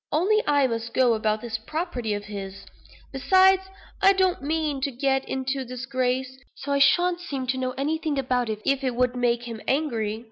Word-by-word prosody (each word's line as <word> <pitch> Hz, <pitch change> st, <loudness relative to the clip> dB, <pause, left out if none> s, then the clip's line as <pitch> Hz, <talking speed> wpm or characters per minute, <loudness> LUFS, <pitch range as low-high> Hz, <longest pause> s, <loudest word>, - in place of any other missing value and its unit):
Only 400 Hz, +8 st, +3 dB
I 285 Hz, -2 st, +4 dB
must 230 Hz, -1 st, -3 dB
go 250 Hz, -2 st, +4 dB
about 215 Hz, -1 st, 0 dB
this 225 Hz, -2 st, -4 dB
property 245 Hz, -, -3 dB
of 205 Hz, 0 st, -6 dB
his. 200 Hz, -1 st, -7 dB, 0.5 s
Besides, 375 Hz, +7 st, +4 dB, 0.4 s
I 390 Hz, -, +6 dB
don't 375 Hz, -4 st, +1 dB
mean 300 Hz, -1 st, -1 dB
to 280 Hz, -, 0 dB
get 270 Hz, +1 st, 0 dB
into 265 Hz, +1 st, -2 dB
disgrace; 255 Hz, +1 st, -2 dB, 0.2 s
so 285 Hz, +1 st, -6 dB
I 280 Hz, -, +2 dB
shan't 350 Hz, +5 st, +4 dB
seem 280 Hz, -7 st, -4 dB
to 260 Hz, +1 st, -1 dB
know 255 Hz, 0 st, -2 dB
anything 305 Hz, +1 st, -1 dB
about 250 Hz, -3 st, 0 dB
it, 215 Hz, -1 st, -4 dB
if 275 Hz, 0 st, +1 dB
it 255 Hz, -2 st, -1 dB
would 250 Hz, 0 st, +1 dB
make 240 Hz, -1 st, +1 dB
him 230 Hz, -2 st, -7 dB
angry. 230 Hz, -7 st, -1 dB
260 Hz, 185 wpm, -25 LUFS, 235-295 Hz, 0.5 s, I